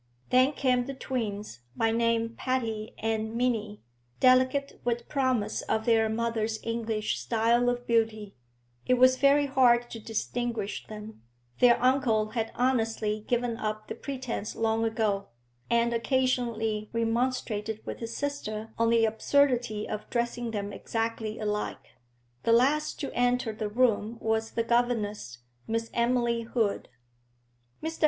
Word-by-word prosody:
Then 255 +3 +5
came 250 -3 +1
the 275 - -5
twins, 210 - -4 0.2
by 225 0 +2
name 230 0 +1
Patty 225 -4 -2
and 220 0 -2
Minnie, 225 -4 -1 0.4
delicate, 260 +2 +3
with 235 -1 -1
promise 260 -6 0
of 220 - -1
their 225 -2 +3
mother's 225 -1 -1
English 225 -2 -2
style 235 +1 +2
of 245 0 -2
beauty; 220 -3 0 0.5
it 255 - +5
was 255 +1 +5
very 280 +1 +4
hard 245 -3 +3
to 225 - -6
distinguish 225 -1 -3
them, 215 - -9 0.4
their 240 -1 +6
uncle 245 -4 +2
had 225 -2 -2
honestly 225 -4 0
given 240 -1 0
up 215 0 -3
the - - -2
pretence 255 -6 -5
long 225 0 +1
ago, 215 -3 0 0.4
and 235 0 +2
occasionally 230 -4 0
remonstrated 230 -2 -1
with - - -5
his 230 0 -5
sister 225 -7 -4
on 230 0 +3
the 230 -1 +4
absurdity 240 -1 +1
of 215 0 -5
dressing 240 -1 -1
them 205 -2 -4
exactly 225 -1 -3
alike. 210 -1 -3 0.5
The 230 - +3
last 285 +6 +2
to 275 - -4
enter 245 -2 +1
the 215 -1 -3
room 225 -1 +1
was 220 0 0
the 230 - 0
governess, 215 - -1 0.2
Miss 225 0 -2
Emily 235 -1 +1
Hood. 225 -3 -1 0.9
Mr. 320 +1 -4
230 Hz, 135 wpm, -28 LUFS, 220-245 Hz, 0.9 s, their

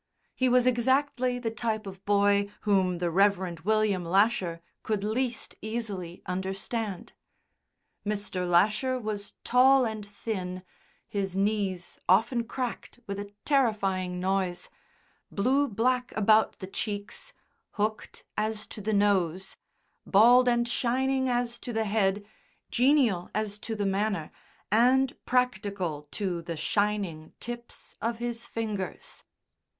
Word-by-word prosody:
He 255 0 +1
was 250 0 +4
exactly 255 +1 +2
the 235 -2 -3
type 225 -1 -2
of 190 -1 -9
boy 200 0 +3
whom 190 -4 +2
the 175 -1 -1
Rev. 185 -3 +2
William 215 -2 +2
Lasher 185 -1 +2 0.2
could 215 -3 -2
least 240 +3 -2
easily 205 -6 -4
understand. 190 +2 -4 0.9
Mr. 205 -3 -2
Lasher 215 +9 +3
was 210 -3 -5
tall 260 +1 +5
and 220 -2 -4
thin 190 -3 -5 0.4
(his 195 -2 -2
knees 195 -3 -1
often 230 +5 +3
cracked 245 0 -5
with 200 0 -4
a 205 0 -7
terrifying 195 -10 +1
noise), 185 -1 -1 0.6
blue 265 +8 +2
black 250 +3 0
about 215 +1 +4
the 190 - -6
cheeks 205 - -5 0.4
hooked 215 +1 -3
as 215 0 -1
to 215 - -9
the 215 +2 -1
nose, 190 -3 +1 0.5
bald 245 +5 +6
and 240 0 +2
shining 260 +2 +1
as 240 -1 -1
to 245 - -6
the 220 -1 0
head, 205 -1 +1 0.5
genial 245 -9 +3
as 210 -1 -2
to 225 - -4
the 205 -1 -1
manner, 195 -4 -1 0.4
and 255 +4 +4
practical 200 -11 0
to 180 -1 -2
the 165 -1 -5
shining 195 -3 -1
tips 240 0 -7
of 230 +2 -1
his 235 0 -4
fingers. 215 -4 -5
210 Hz, 125 wpm, -28 LUFS, 195-235 Hz, 0.9 s, bald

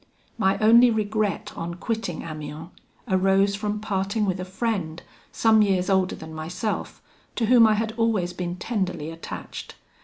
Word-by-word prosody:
"My 195 -4 +2
only 235 +3 +6
regret 215 -3 -1
on 170 +1 -5
quitting 220 -3 -3
Amiens 155 +1 -7 0.4
arose 195 0 +3
from 210 +1 -2
parting 205 +1 -1
with 185 -2 -1
a 185 - -4
friend, 185 -5 -2 0.3
some 220 -1 +4
years 190 -2 +2
older 190 -1 +2
than 160 0 -10
myself, 175 +7 -4 0.3
to 230 - 0
whom 230 0 +7
I 215 - +3
had 220 +1 -2
always 215 -6 +1
been 175 -1 -4
tenderly 180 -6 -3
attached. 165 0 -8
195 Hz, 150 wpm, -24 LUFS, 175-220 Hz, 0.4 s, whom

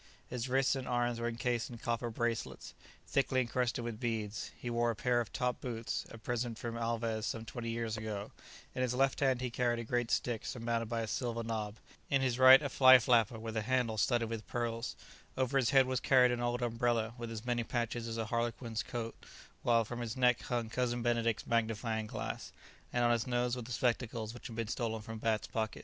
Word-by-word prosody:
His 125 0 -4
wrists 135 +1 +3
and 130 -1 -4
arms 120 -1 0
were 115 - -1
encased 120 0 -1
in 120 - -8
copper 120 +1 -2
bracelets, 115 0 -3 0.3
thickly 135 -1 +1
encrusted 125 -1 0
with 115 -2 -4
beads; 110 -3 -2
he - - -8
wore 120 0 +1
a 115 - -1
pair 120 +2 +2
of 110 -5 -6
top 125 +1 -1
boots, 115 -2 -3
a - - -9
present 120 0 -2
from 115 0 -4
Alvez 115 -1 -1
some 115 -1 -3
twenty 115 +1 -5
years 115 -1 -2
ago; 105 -2 -4 0.4
in 130 - -2
his 125 -1 0
left 135 +1 +2
hand 130 -3 +2
he 125 -1 -2
carried 120 0 +1
a 115 - -3
great 120 +1 -1
stick 120 -3 0
surmounted 115 -2 -2
by 115 -1 -1
a 110 - -3
silver 115 +2 -2
knob; 110 -2 -3 0.3
in 135 -1 +2
his 125 -1 0
right 130 +2 +9
a 140 - -1
fly 130 -1 +8
flapper 115 -2 +3
with 110 0 -6
a 110 - +1
handle 125 0 +1
studded 115 +2 +2
with 110 -1 -5
pearls; 120 0 -2 0.4
over 130 +1 0
his 130 -4 +3
head 135 -1 +6
was 130 -1 0
carried 125 -1 +5
an 120 0 -1
old 120 +1 0
umbrella 115 -1 0
with 120 -1 -4
as 115 0 -6
many 120 -1 0
patches 115 0 -2
as 115 0 -4
a 115 - -1
Harlequin's 115 0 -2
coat, 115 -2 -4 0.5
whilst 115 -2 +3
from 120 +1 -5
his 115 +1 -4
neck 125 -1 +4
hung 120 -2 -2
Cousin 120 0 -1
Benedict's 115 -1 +1
magnifying 110 -1 0
glass, - - -5 0.4
and 120 - +1
on 120 - +4
his 115 0 +1
nose 120 0 +1
were 125 - -4
the 120 +2 -9
spectacles 115 -2 -1
which 120 - -8
had 115 - -8
been 115 -1 -2
stolen 110 -1 -2
from 110 0 -7
Bat's 110 -1 0
pocket. 110 -1 -3
120 Hz, 215 wpm, -33 LUFS, 115-125 Hz, 0.5 s, right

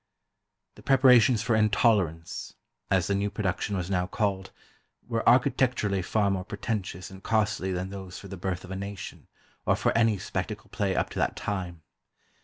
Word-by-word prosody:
The - - -15
preparations 125 -4 +5
for 115 0 +2
"Intolerance," 105 -6 +1 0.3
as 90 -3 +2
the 100 - 0
new 100 +1 0
production 100 -1 -2
was 90 -2 -3
now 90 -2 0
called, 100 -2 -1 0.6
were 115 -2 -1
architecturally 120 -5 +2
far 100 +2 +1
more 95 -1 -1
pretentious 95 -2 -4
and 95 0 -11
costly 105 -3 0
than 90 +1 -3
those 95 -2 -7
for 100 - -10
"The 95 - -7
Birth 90 0 -3
of 90 - -10
a - - -3
Nation," 100 0 -7 0.4
or - - +2
for - - 0
any 115 -2 +3
spectacle 100 +3 -5
play 100 -3 -1
up - - 0
to - - -4
that - - 0
time. 90 -5 -4
100 Hz, 170 wpm, -27 LUFS, 95-110 Hz, 0.6 s, preparations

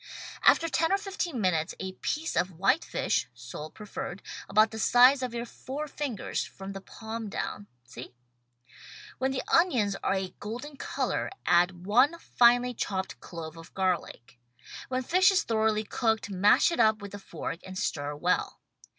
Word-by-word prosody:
After 330 - +5
ten 325 +1 +1
or 390 - +4
fifteen 385 - -3
minutes, 175 -5 0
a 190 0 -4
piece 310 - -3
of 175 0 0
white 255 - +3
fish 130 - -1
(sole 125 +5 -8
preferred) 200 -1 -7 0.3
about 215 +1 +4
the 220 - -6
size 250 +5 +6
of 255 -2 -2
your 235 0 -4
four 275 +5 -6
fingers, 280 -7 -3
from 195 0 -9
the 195 - -7
palm 220 +2 -7
down 205 0 -4
— 120 - -45
see? 125 +1 -9 1.0
When 265 +1 +1
the 265 -1 -2
onions 245 - +3
are 195 - +1
a 190 -1 -3
golden 245 +8 -6
color - - -2 0.2
add 175 +1 +3
one 255 - +4
finely 245 -4 +4
chopped 190 -4 -3
clove 165 -2 -8
of 165 0 -13
garlic. 175 -11 -2 0.5
When 255 0 -2
fish 370 +8 +5
is 390 -2 +3
thoroughly 220 -1 +1
cooked, 220 -1 -1
mash 195 - +4
it 335 - -2
up 220 -1 +4
with 200 -1 -9
a 205 - -6
fork 165 -3 -6
and 185 0 -8
stir 145 -6 -2
well. 175 +5 0
215 Hz, 170 wpm, -28 LUFS, 185-255 Hz, 1.0 s, size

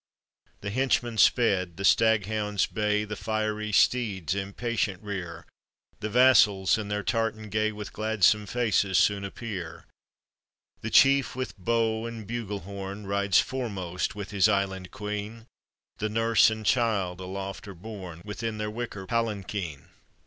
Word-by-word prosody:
The 100 - -4
henchman 120 -2 0
sped, 95 -9 +3
the 95 - -2
staghounds 105 -2 +2
bay, 105 -1 0
The 105 0 -5
fiery 110 0 -2
steeds 100 -6 +2
impatient 100 0 -2
rear, 95 -5 -6 0.5
The 110 +1 -3
vassals 110 -5 +5
in 105 - -4
their 105 0 -2
tartan 110 -1 -1
gay, 110 +1 +1
With 105 -1 -8
gladsome 105 -1 +2
faces 105 -5 +1
soon 100 -1 +3
appear. 100 -5 -6 1.0
The 115 - -3
chief 135 +3 +5
with 130 0 -4
bow 115 +2 0
and 115 -3 -8
buglehorn 100 -3 -5
Rides 100 -1 +2
foremost 95 -9 -3
with 100 -1 -6
his 100 0 +4
island 95 -2 -1
queen, 105 +2 -6 0.5
The 110 - -1
nurse 115 +1 +4
and 110 -1 -5
child 100 -7 +1
aloft 95 +2 -6
are 100 - -8
borne 90 -3 -9
Within 110 +1 -4
their 105 0 -3
wicker 110 -4 -5
palanquin. 100 -8 -3
105 Hz, 135 wpm, -27 LUFS, 100-115 Hz, 1.0 s, vassals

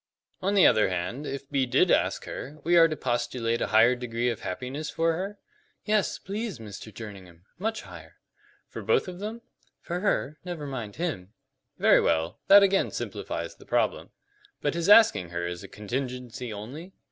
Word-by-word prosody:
"On 195 +2 0
the 195 - +7
other 110 -3 +5
hand, 95 +11 -3
if 140 0 -5
B 135 -2 0
did - - +3
ask - - +2
her, 150 +3 -7
we 175 +2 +3
are 165 -1 +8
to 155 - -3
postulate 120 -2 -1
a - - +1
higher 115 +3 +5
degree 120 -1 -2
of 115 - -5
happiness 130 +10 -4
for 165 0 +1
her?" 195 +5 -4 0.5
"Yes, 210 -2 +1
please, 210 +3 -4
Mr. 110 -1 -9
Jerningham 95 -5 -11
much 220 +2 -2
higher." - - -12 0.5
"For - - -7
both - - +2
of 180 -1 -7
them?" 220 +3 -6 0.4
"For 175 0 -4
her. 155 -6 0
Never 175 -5 -5
mind 120 -7 -5
him." 125 - -4 0.4
"Very - - +5
well. 80 +1 0
That 200 +1 +9
again 195 0 +3
simplifies - - -5
the - - -16
problem. - - 0 0.5
But - - 0
his 170 +2 -1
asking 215 - +6
her 85 0 -3
is 85 0 -5
a - - -8
contingency 125 +1 -5
only?" 135 - -8
130 Hz, 175 wpm, -27 LUFS, 110-180 Hz, 0.5 s, That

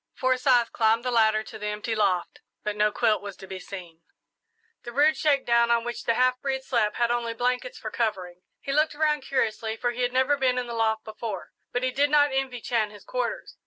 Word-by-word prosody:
Forsyth 255 -2 +2
climbed 225 +1 +2
the 250 - 0
ladder 220 -2 +3
to - - -10
the 210 - -4
empty 210 +2 -3
loft, 195 -5 0 0.2
but 210 -1 -2
no 210 0 +2
quilt 220 -1 +1
was 200 -2 -7
to - - -10
be 190 0 -7
seen. 180 -3 -10 0.8
The 240 - -8
rude 295 +5 +4
shakedown 240 -6 +2
on 235 -1 +3
which 240 0 -5
the 230 - +2
half 255 +1 +2
breed 265 -1 -2
slept 210 -4 0
had 235 0 +1
only 235 -1 -1
blankets 250 - -1
for - - -6
covering. 185 -6 -2 0.2
He 275 - -4
looked 305 +1 +2
around 300 -1 +1
curiously, 225 -4 -1
for 245 +1 0
he 245 +1 -5
had 245 0 +1
never 260 +3 +2
been 255 -2 +1
in 250 - -1
the 240 - -6
loft 220 -1 0
before, 215 -3 -6 0.2
but 245 - -1
he 255 - +1
did 285 +3 +2
not 290 -1 +4
envy 265 -2 -2
Chan 225 -3 0
his 205 -1 -14
quarters. - - -4
235 Hz, 220 wpm, -26 LUFS, 215-260 Hz, 0.8 s, rude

